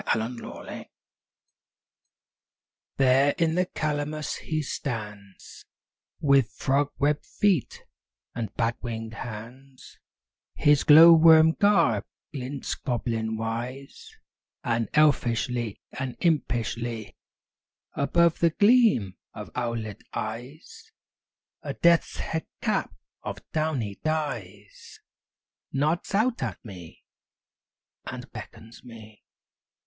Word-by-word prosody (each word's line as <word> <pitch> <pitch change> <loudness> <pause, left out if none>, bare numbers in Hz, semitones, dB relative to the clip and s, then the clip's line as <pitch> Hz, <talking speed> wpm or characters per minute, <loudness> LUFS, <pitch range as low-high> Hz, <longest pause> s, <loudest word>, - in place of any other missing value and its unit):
WILL 110 - -1
O' 120 +3 -4
THE 120 - -9
WISP - - -12
I - - -8 2.1
There 135 +1 +4
in 165 -2 +1
the 180 +1 +1
calamus 150 -1 -3
he 155 -1 -3
stands 105 -8 -7 0.6
With 140 -4 +3
frog 140 +2 +1
webbed 145 +1 0
feet 195 -9 0 0.5
and 115 -3 -4
bat 115 0 0
winged 115 -2 -5
hands; 125 +4 -10 0.6
His 145 -1 +3
glow 160 +3 +9
worm 160 0 +7
garb 170 - +2 0.3
glints 135 0 -4
goblin 115 -3 -2
wise; 120 +5 -5 0.5
And 115 -2 -1
elfishly, 125 -6 +1
and 130 -2 -5
impishly, 120 - -1 0.8
Above 170 +4 +2
the 170 - +4
gleam 205 - +3 0.2
of - - -8
owlet 115 -4 -3
eyes, 120 +8 -7 0.7
A - - -5
death's 170 -1 +3
head 160 -1 -4
cap - - -1 0.3
of - - -5
downy 140 -11 -2
dyes 115 -11 -5 0.7
Nods 155 +7 -1
out 230 +4 +1
at - - -3
me, 90 -6 -11 1.0
and - - -7
beckons 115 +1 -11
me. 110 -3 -13
130 Hz, 100 wpm, -26 LUFS, 115-155 Hz, 2.1 s, glow